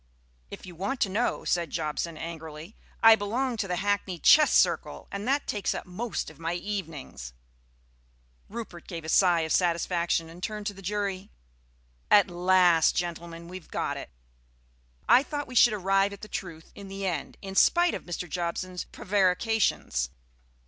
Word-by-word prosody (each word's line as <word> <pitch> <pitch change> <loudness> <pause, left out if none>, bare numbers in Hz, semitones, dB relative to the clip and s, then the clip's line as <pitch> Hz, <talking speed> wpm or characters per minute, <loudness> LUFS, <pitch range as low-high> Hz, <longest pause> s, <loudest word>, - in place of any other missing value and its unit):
"If - - -9
you 180 - -10
want 200 +10 -3
to 195 - +3
know," 220 +6 -1
said 170 -2 0
Jobson 160 +1 -3
angrily, 160 +2 -8 0.3
"I 225 0 +10
belong 235 +5 -1
to 210 - -2
the 180 - -1
Hackney 200 -1 -1
Chess 305 - +6
Circle, - - +2
and 200 +3 -5
that 280 +2 +1
takes 205 -2 -1
up - - -5
most 185 0 -4
of 155 - -19
my 165 +1 -2
evenings." 160 - -6 1.2
Rupert 215 -6 -8
gave 165 -3 -6
a - - -5
sigh 175 -1 +4
of 160 0 -3
satisfaction 170 -1 +1
and 165 +2 -12
turned 210 +1 -4
to 205 - -2
the 195 - -12
jury. 200 0 -3 0.8
"At 200 -3 +5
last, 175 -2 +4
gentlemen, 170 -1 -4
we 185 +1 -7
have 170 - -23
got - - -2
it. - - -7 1.0
I 250 - +7
thought 290 0 -4
we 255 - -11
should 240 -2 +6
arrive 195 0 +1
at 200 - -11
the 215 - -8
truth 165 -6 -7
in 200 -1 -10
the 195 0 -5
end, 180 -3 -3
in 195 0 -6
spite 345 - +4
of - - -5
Mr. 175 0 -5
Jobson's 180 +2 -3
prevarications." 190 - 0
185 Hz, 170 wpm, -27 LUFS, 170-205 Hz, 1.2 s, I